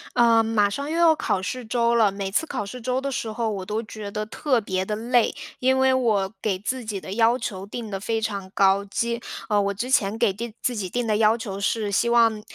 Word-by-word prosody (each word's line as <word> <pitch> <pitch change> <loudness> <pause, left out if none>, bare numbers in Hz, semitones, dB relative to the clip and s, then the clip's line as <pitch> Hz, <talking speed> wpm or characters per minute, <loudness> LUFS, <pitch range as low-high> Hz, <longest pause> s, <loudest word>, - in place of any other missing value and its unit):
呃， 230 -1 +5
马 220 -2 +2
上 280 +8 -4
又 330 - -1
要 335 -1 +6
考 195 -10 -1
试 250 +6 -4
周 235 +1 +1
了。 220 -3 +4
每 195 0 -4
次 320 - +1
考 210 - -4
试 225 +6 -8
周 255 +2 -1
的 275 0 -3
时 230 -3 -3
候， 225 +1 -2
我 195 -3 -4
都 215 +3 -2
觉 215 -1 -7
得 210 +1 -3
特 250 +2 0
别 190 -2 -2
地 210 - -2
累， 235 +2 +1 0.2
因 260 +1 +3
为 265 0 +4
我 215 -6 +1
给 200 -4 0
自 245 +5 -4
己 205 -3 -4
的 - - -8
要 230 +2 +3
求 195 -6 -5
定 220 +1 -7
得 195 - -3
非 225 +3 -2
常 200 -3 -3
高， 195 0 +3
基 235 +4 -2 0.4
我 200 - 0
之 235 +6 -4
前 215 -5 +2
给 230 -3 +3
定 235 +5 -5
给 - - -31
自 250 - 0
己 200 -4 -3
定 245 +5 -2
的 215 -2 +1
要 220 +1 +4
求 200 -4 -5
是 205 +1 -1
希 220 +4 +2
望， 230 -2 +4
220 Hz, 265 characters per minute, -24 LUFS, 200-240 Hz, 0.4 s, 要